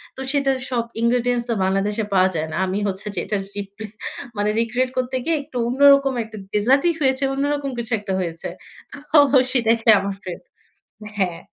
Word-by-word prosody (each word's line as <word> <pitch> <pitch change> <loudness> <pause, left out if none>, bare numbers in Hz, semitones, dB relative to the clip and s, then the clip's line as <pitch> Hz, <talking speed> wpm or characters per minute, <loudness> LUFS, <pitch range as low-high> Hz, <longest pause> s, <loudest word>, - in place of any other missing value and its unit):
তো 265 - -7
সেটার 275 -2 +1
সব 240 -2 0 0.2
ইনগ্রেডিয়েন্টস 240 0 +1
তো 230 - +2
বাংলাদেশে 200 +3 0
পাওয়া 185 0 +4
যায় 160 0 -1
না। - - -3
আমি 190 +2 -1
হচ্ছে 195 +1 -4
যে - - -1
এটার 200 -2 -2
রিপে 200 +2 -7 0.5
মানে 205 +1 +1
রিক্রিয়েট 245 +3 0
করতে 255 +1 -1
গিয়ে 325 +1 +1
একটু 255 - -8
অন্যরকম 275 +1 +5
একটা 220 0 -11 0.2
ডেজার্টই 270 +11 +3
হয়েছে, 265 0 +2
অন্যরকম 285 0 -1
কিছু 235 +1 -5
একটা 195 -2 -4
হয়েছে। 170 -2 -4 0.6
তো 310 - +6 0.3
সেটাকে 230 -2 +2
আমার 195 0 -3
ফ্রেন 180 -3 -6 0.8
হ্যাঁ। 180 -4 0
235 Hz, 165 wpm, -21 LUFS, 200-265 Hz, 0.8 s, তো